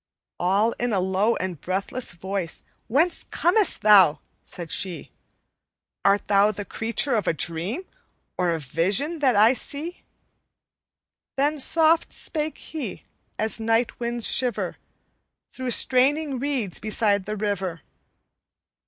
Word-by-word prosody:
"All 200 +6 +2
in 245 -2 0
a 195 - +2
low 190 +5 +1
and 180 -5 -4
breathless 195 +5 -2
voice, 185 -1 -4 0.2
'Whence 315 +9 +2
comest 385 +4 +2
thou?' 190 -8 +6 0.2
said 170 -2 -7
she; 180 -5 -2 0.9
'Art 200 +1 +2
thou 205 +1 +4
the 205 0 -6
creature 230 +6 -1
of 215 -4 0
a - - +3
dream, 170 - -2 0.5
Or 180 - 0
a 165 -1 0
vision 190 - 0
that 260 -5 +3
I 215 +4 +6
see?' 305 +6 -3 1.4
Then 290 +2 +1
soft 325 +3 +3
spake 310 -1 -2
he, 285 - -7 0.3
as 220 +1 -1
night 225 +1 0
winds 235 -1 +1
shiver 250 -4 0 0.7
Through 260 -1 -5
straining 270 +3 +2
reeds 255 -9 -2
beside 205 -2 0
the 215 0 -3
river. 195 -5 -3
220 Hz, 125 wpm, -24 LUFS, 190-270 Hz, 1.4 s, thou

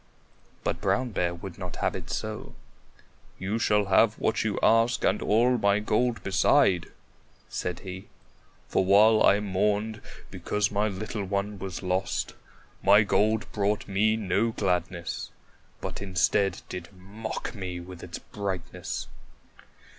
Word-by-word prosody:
But - - -2
Brown 130 -1 +1
Bear 85 -3 0
would 90 +1 -9
not 90 -2 -5
have - - -1
it - - -7
so. - - -4 0.8
"You 100 +5 -2
shall 105 -2 +3
have 105 +3 +4
what 110 - 0
you 110 -2 -1
ask 115 +2 +4
and 95 - +2
all 120 +3 +3
my 100 -1 +3
gold 115 +3 0
beside," 95 -1 +3 0.6
said 90 -1 -3
he. 95 0 -8 0.6
"For 95 - +2
while 105 +3 +6
I 100 - +5
mourned 105 +2 0 0.3
because 105 -1 -1
my 105 +1 +1
little 105 +1 -4
one 100 +1 -2
was 95 -1 -5
lost, 95 +1 -1 0.5
my 100 +2 +6
gold 105 +2 +2
brought 105 0 0
me 105 +2 +2
no 105 +1 +1
gladness, 90 -4 -2 0.5
but - - -5
instead 95 0 +1
did 90 -2 -7
mock 105 +4 -6
me 90 -3 -5
with 90 0 -10
its - - -6
brightness." 95 -4 -5
100 Hz, 135 wpm, -27 LUFS, 95-110 Hz, 0.8 s, while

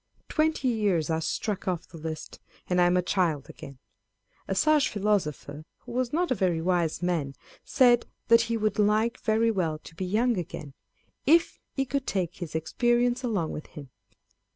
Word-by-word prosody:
Twenty 310 -3 +1
years 200 -9 +1
are 160 0 0
struck 195 +5 -3
off 180 -3 -2
the 165 - -11
list, 160 0 -6 0.3
and 180 0 +2
I 175 - +5
am 180 +1 +3
a 180 - +1
child 170 -7 0
again. 140 -1 -11 0.7
A - - -1
sage 305 -2 +4
philosopher, 180 -8 -1 0.2
who 245 - -11
was 250 0 -1
not 345 +1 0
a - - +6
very 180 -7 +1
wise 175 -1 0
man, 160 -6 -1 0.3
said, 245 -3 +4 0.2
that 230 0 +6
he 230 - +1
should 215 0 -1
like 215 +3 +2
"very 225 +1 +2
well 170 -7 -1
to - - -12
be 185 +3 -4
young 220 +3 +1
again, 160 -5 -7 0.5
if 330 +3 +4 0.2
he 270 - 0
could 275 0 -2
take 180 -3 -2
his 170 -4 -6
expe 240 +9 +1
rience 245 +1 +1
along 200 -10 -1
with 150 - -7
him. 140 -4 -11
195 Hz, 180 wpm, -27 LUFS, 165-240 Hz, 0.7 s, a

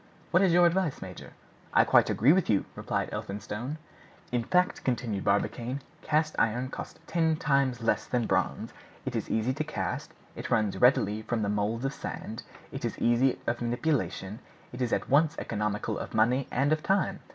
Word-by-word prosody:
What 175 - +5
is 190 -3 +4
your 175 +1 +6
advice, 170 -3 +1
major?" 95 -2 -9 0.4
"I - - +7
quite - - +4
agree 130 +8 +5
with 185 0 +1
you," 100 -3 +2
replied - - -2
Elphinstone. 105 +8 -5 0.5
"In 120 -1 0
fact," 180 +6 +1
continued 120 -5 -1
Barbicane, 120 +6 0 0.2
"cast 155 0 +1
iron 120 +3 +1
costs - - -8
ten 160 -1 +1
times 140 -5 +1
less 115 - +1
than 120 -2 0
bronze; - - -1 0.3
it - - -3
is - - -2
easy 110 +4 +1
to 155 +3 -2
cast, 150 - -4 0.2
it - - -6
runs 105 -2 +1
readily 110 -4 +4
from 110 0 -2
the 100 - 0
moulds 105 +4 -1
of 135 - -1
sand, 110 -4 -6 0.3
it - - -6
is - - -2
easy 120 +2 +3
of 120 - -1
manipulation, 120 -5 -1 0.3
it 125 - -6
is 120 -2 0
at - - 0
once 150 +3 +3
economical 105 -1 -2
of - - -6
money 125 +5 +3
and 140 +4 +2
of 155 - -1
time. 195 +1 +1
125 Hz, 180 wpm, -29 LUFS, 110-155 Hz, 0.5 s, I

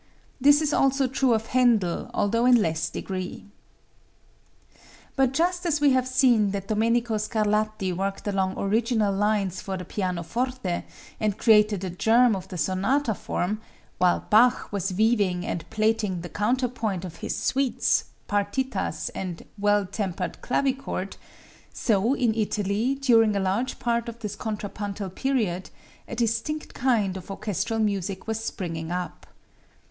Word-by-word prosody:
This 290 +2 +5
also 270 0 +3
is - - -12
true 255 -4 +3
of 220 +1 -3
Händel, 235 -8 +2
although 230 +4 +1
in 250 - +7
less 165 -4 0
degree. 185 -1 -5 1.7
But 265 -2 +3
just 350 +5 0
as 320 -4 +1
we 290 -1 +4
have 255 -1 +2
seen 250 -5 +4
that 195 -1 -4
Domenico 230 +1 +1
Scarlatti 215 -2 0
worked 195 +3 -3
along 190 -2 0
original 215 0 +1
lines 200 -2 0
for 190 -1 -4
the 180 - -7
pianoforte 185 +3 -2 0.3
and 210 -2 0
created 210 -3 +4
the 190 -2 -3
germ 225 +5 +4
of 190 -1 -6
the 185 - -7
sonata 205 - +1
form, 210 +2 -3 0.4
while 180 -1 +3
Bach 240 +4 +4
was 195 -1 -2
weaving 200 -3 +1
and 170 0 -4
plaiting 215 -4 0
the 175 - -7
counterpoint 225 -4 -1
of 165 -3 -8
his - - -4
suites, 270 -1 +1 0.2
partitas 205 +6 -1
and 180 -3 -5
"Well 205 0 +3
Tempered 185 -2 -4
Clavichord," 265 -7 -1 0.6
so 225 +4 +1
in 240 -5 +1
Italy, 215 +3 0
during 230 -6 +4
a - - +1
large 195 +7 -1
part 235 -1 -1
of 235 - -9
this 210 -2 -4
contrapuntal 205 -2 -5
period, 210 -6 -1 0.4
a - - -6
distinct 230 +7 -1
kind 225 -7 +1
of 185 - -10
orchestral 210 +3 -2
music 200 -3 -1
was 225 0 -3
springing 165 -6 -4
up. 180 -1 -5
215 Hz, 140 wpm, -25 LUFS, 190-240 Hz, 1.7 s, in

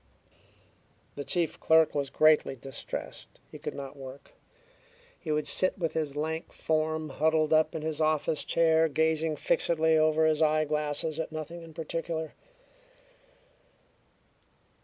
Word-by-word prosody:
The 145 - -6
chief 165 +4 -1
clerk 160 -1 +4
was 140 -2 -1
greatly 155 -1 +4
distressed. 135 +1 -7
He - - -10
could - - -5
not 140 0 -7
work. 135 0 -11 0.9
He 155 - -4
would 150 0 0
sit 185 +6 +1
with 165 -4 -2
his 150 -3 -2
lank 160 +2 -3
form 155 0 -1
huddled 155 +2 +1
up 155 +1 +3
in 155 - -4
his 160 0 -2
office 155 -1 +1
chair, 160 -1 +3
gazing 160 0 +1
fixedly 160 +2 +1
over 155 0 +3
his 155 0 +2
eyeglasses 155 0 0
at 160 - -3
nothing 160 +2 -6
in 165 -2 -13
particular. 160 -1 -4
155 Hz, 130 wpm, -29 LUFS, 150-160 Hz, 0.9 s, clerk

